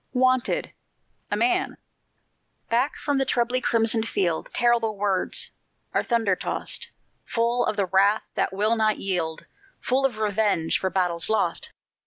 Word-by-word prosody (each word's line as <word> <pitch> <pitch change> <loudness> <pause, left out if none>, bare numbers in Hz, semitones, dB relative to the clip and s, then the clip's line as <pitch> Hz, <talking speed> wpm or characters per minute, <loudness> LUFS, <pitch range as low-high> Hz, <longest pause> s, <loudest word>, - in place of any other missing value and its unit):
WANTED 255 -1 +1 0.6
A - - -1
MAN 365 +1 +1 0.9
Back 245 +5 +1
from 285 -2 -1
the - - +3
trebly 250 0 0
crimsoned 225 -1 +1
field 170 -4 -1
Terrible 230 -3 +1
words 195 -2 0 0.4
are - - +2
thunder 225 -6 +1
tost; - - -1 0.4
Full 235 +1 0
of - - 0
the 200 -2 +1
wrath 195 +3 +3
that - - 0
will 210 +4 +1
not 215 -1 +1
yield, 170 -5 -1 0.3
Full 260 +2 0
of 240 -5 -10
revenge 205 -6 +1
for 190 - -1
battles 180 -2 0
lost! 220 - 0
220 Hz, 140 wpm, -25 LUFS, 195-240 Hz, 0.9 s, the